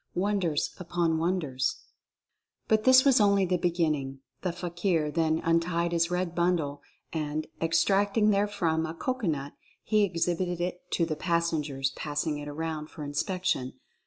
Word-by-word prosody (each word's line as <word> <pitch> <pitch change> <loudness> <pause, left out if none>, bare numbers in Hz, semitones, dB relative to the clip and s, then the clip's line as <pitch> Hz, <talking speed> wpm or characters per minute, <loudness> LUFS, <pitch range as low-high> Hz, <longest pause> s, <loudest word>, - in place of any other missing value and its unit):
WONDERS 180 -5 0
UPON 170 -2 0
WONDERS. 155 -7 0 0.9
But 215 0 +2
this 260 +1 +7
was 265 -5 +5
only 200 -1 +4
the 180 0 +1
beginning. 155 -6 -1 0.2
The 180 - -1
fakir 175 -2 -1
then 160 0 +1
untied 170 +1 +1
his 170 0 +2
red 180 -1 -1
bundle, 170 -5 0 0.3
and, 155 -1 -2 0.2
extracting 200 +6 +3
therefrom 195 -6 +1
a 160 - -6
cocoanut, 165 - -2 0.3
he 215 -1 +2
exhibited 175 -1 0
it 180 0 -4
to 170 - +2
the 160 -1 -2
passengers, 155 -5 0
passing 145 +1 -2
it 145 - -7
around 155 +1 -4
for 155 - -8
inspection. 145 -2 -1
170 Hz, 135 wpm, -28 LUFS, 155-185 Hz, 0.9 s, this